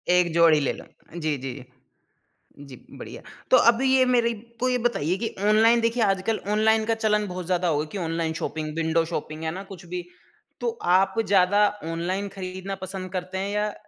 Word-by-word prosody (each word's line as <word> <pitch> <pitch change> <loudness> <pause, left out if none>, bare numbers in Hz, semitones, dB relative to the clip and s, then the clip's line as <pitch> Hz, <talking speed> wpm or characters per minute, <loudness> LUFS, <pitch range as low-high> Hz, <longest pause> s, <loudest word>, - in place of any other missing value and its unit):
1 175 -2 +3
जोड़ी 165 -2 +5
ले 140 - 0
लो। - - -11 0.3
जी, 155 -3 -1
जी। 130 0 -7 1.0
जी, 130 - -10 0.2
बढ़िया। - - -9 0.3
तो 255 - +8
अभी 245 +3 -2
ये 260 -1 +5
मेरे 240 -2 +2 0.3
को 255 +1 +1
ये 250 - +1
बताइए 210 -8 0
कि 225 +2 -2 0.2
ऑनलाइन, 225 +2 +5
देखिए 230 0 +1
आजकल 195 +2 0 0.2
ऑनलाइन 220 0 +3
का 225 0 +1
चलन 210 -2 +1
बहुत 180 -1 -6
ज़्यादा 180 0 0
हो 155 -3 +1
गया 155 - -1
कि 205 - -5
ऑनलाइन 165 -2 -2
शौपिंग, 155 -1 -4
विंडो 165 0 +1
शौपिंग, 155 +1 -5
है 160 - -1
ना, 190 +3 -6
कुछ 190 -3 -12
भी। 180 0 -5 0.6
तो 475 - 0 0.3
आप 195 +3 +1
ज़्यादा 205 +2 +4 0.2
ऑनलाइन 185 +4 -2
खरीदना 190 +1 -5
पसंद 190 -1 -6
करते 185 +1 -4
हैं 195 +1 -2
या 210 0 -1
190 Hz, 190 wpm, -25 LUFS, 165-220 Hz, 1.0 s, तो